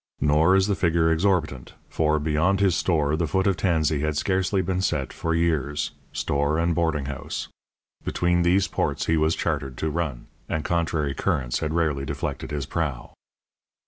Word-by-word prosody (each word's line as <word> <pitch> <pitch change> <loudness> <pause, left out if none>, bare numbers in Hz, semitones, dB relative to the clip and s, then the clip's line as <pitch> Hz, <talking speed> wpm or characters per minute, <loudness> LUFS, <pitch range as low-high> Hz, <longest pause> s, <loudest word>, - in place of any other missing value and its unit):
Nor 75 +5 +4
is 95 0 +4
the 105 - +1
figure 85 -3 +2
exorbitant, 80 -7 0
for, 75 -1 +1
beyond 80 +6 +1
his 95 -4 +3
store 75 -5 +1
the 80 +1 -1
foot 95 +5 0
of 100 -2 +3
Tansey 80 -5 +1
had 75 0 -1
scarcely 95 +1 +1
been 90 +1 -1
set 75 -7 -1
for 85 -1 -1
years 80 -4 0 0.2
store 70 +2 0
and 85 +1 +1
boarding 80 -4 0
house; 70 0 -5 0.5
between 85 0 +1
these 90 +3 +3
ports - - -1
he 80 - +2
was 80 +1 +2
chartered 65 -2 -2
to 80 - -1
run, 75 -7 -3 0.2
and 80 - -2
contrary 80 -4 0
currents - - -1
had 80 -1 -2
rarely 75 -5 +1
deflected 70 - -4
his 75 -2 -3
prow. 75 -5 -3
80 Hz, 170 wpm, -25 LUFS, 75-85 Hz, 0.5 s, Nor